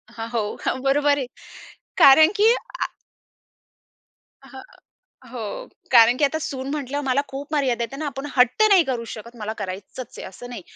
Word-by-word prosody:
हां, 225 0 -5
हो, 235 -1 -1 0.3
हो, - - +1
बरोबर 285 +1 +2
आहे. 265 - -2 0.7
कारण 310 +4 +8
की 450 +3 +6 0.3
आ - - +1 1.6
हां, - - -11 0.7
हो. 225 -5 -6 0.2
कारण 235 0 +6
की 295 - -1
आता 315 +3 -2
सून 275 -4 -5
म्हटल्यावर 285 -1 -3
मला 265 +2 +2
खूप 280 +3 -8
मर्यादा 255 -5 +1
येते 270 +4 -6
ना, 310 - -4
आपण 275 0 -5
हट्ट 250 - +4
नाही 375 -4 +6
करू 245 -4 -3
शकत, 235 +2 -11
मला 215 0 -4
करायचंच 195 +6 -7
आहे - - -7
असं 245 +6 -11
नाही. 240 -6 -7
265 Hz, 165 wpm, -22 LUFS, 235-285 Hz, 1.6 s, कारण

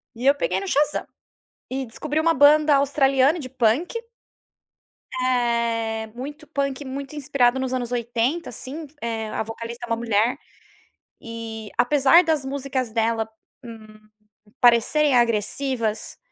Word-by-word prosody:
E 240 +3 -6
eu 280 +1 +6
peguei - - -1
no 390 - -6
Shazam. 295 -2 +1 0.6
E 265 +1 -2
descobri 300 +7 -2
uma 330 +1 +3
banda 295 +1 +6
australiana 275 +2 +3
de 260 -5 -6
punk. 255 - +1 1.3
Eh, 235 -3 0
muito 290 +5 -8
punk 275 -1 -2
muito 275 +2 -6
inspirado 265 -3 +2
nos 260 -1 -2
anos 245 -2 -2
80, 240 +7 -1
assim, 275 +6 -7
eh, 225 -1 -3
a - - -2
vocalista 230 +2 -7
é - - -15
uma 230 - +2
mulher. 230 +1 +1 0.8
E, 225 -2 -7
apesar 290 +6 +5
das 315 -4 0
músicas 265 -3 -3
dela, 225 0 0 0.3
hum, 220 -2 -12 0.6
parecerem 250 +4 +4
agressivas, 230 0 0
255 Hz, 130 wpm, -23 LUFS, 230-280 Hz, 1.3 s, eu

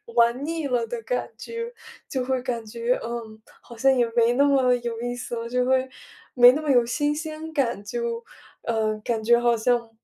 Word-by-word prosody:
玩 235 +4 +3
腻 325 -2 -2
了 245 -3 0
的 475 - -5
感 - - -2
觉， 465 +1 -6 0.3
就 260 -2 -2
会 260 0 -1
感 240 -3 -3
觉， 235 +3 -1
嗯， 230 -2 -6 0.2
好 235 - -13
像 270 +4 +4
也 240 -1 +3
没 235 0 +4
那 280 +3 +4
么 265 -3 +4
有 235 -1 -4
意 245 0 -2
思 245 -1 -5
了， 230 0 -5
就 250 0 +1
会 260 0 +2 0.5
没 245 -1 +9
那 305 - -2
么 305 - -4
有 245 -2 +4
新 290 +5 0
鲜 315 0 -6
感， 245 -9 -1
就， 470 - -3 0.4
嗯， 215 -2 -1
感 230 -2 -1
觉 235 +1 +5
好 240 -1 +2
像 235 0 +1
245 Hz, 215 characters per minute, -24 LUFS, 235-285 Hz, 0.5 s, 没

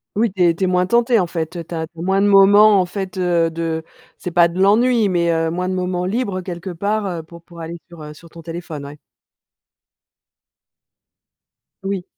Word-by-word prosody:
Oui 220 +1 +1
tu 185 - -2
es 170 -1 +3
tu 190 - -3
es - - +2
moins 180 0 +1
tentée 235 +1 +3
en 180 - 0
fait, 165 0 -4
heu, 170 - -5
tu 170 - -8
as 160 0 -3
tu 165 +1 -17
as - - -5
moins 190 +2 +1
de 205 - +3
moments 205 +1 +6
en - - -1
fait 190 0 -6
heu 170 -2 +1
de 165 -1 -3 0.3
c'est 180 - -6
pas 170 0 +5
de 170 +2 -6
l'ennui, 220 +3 +3
mais, 170 -2 +1
heu, 165 0 0
moins 180 +2 -2
de 185 - -2
moments 180 -1 -2
libres, 200 -1 -2
heu, - - -6
quelque 180 0 -6
part, 205 +5 -2
heu, 175 -4 -4
pour 170 +1 -15
pour 170 0 -14
aller 165 +1 -6
sur, 170 -2 -13
heu, 150 0 -9
sur 170 - -16
ton 165 - -13
téléphone. 165 -3 -7
Ouais. 145 +1 -11 2.8
Oui. 195 -1 -3
180 Hz, 220 wpm, -19 LUFS, 170-195 Hz, 2.8 s, moments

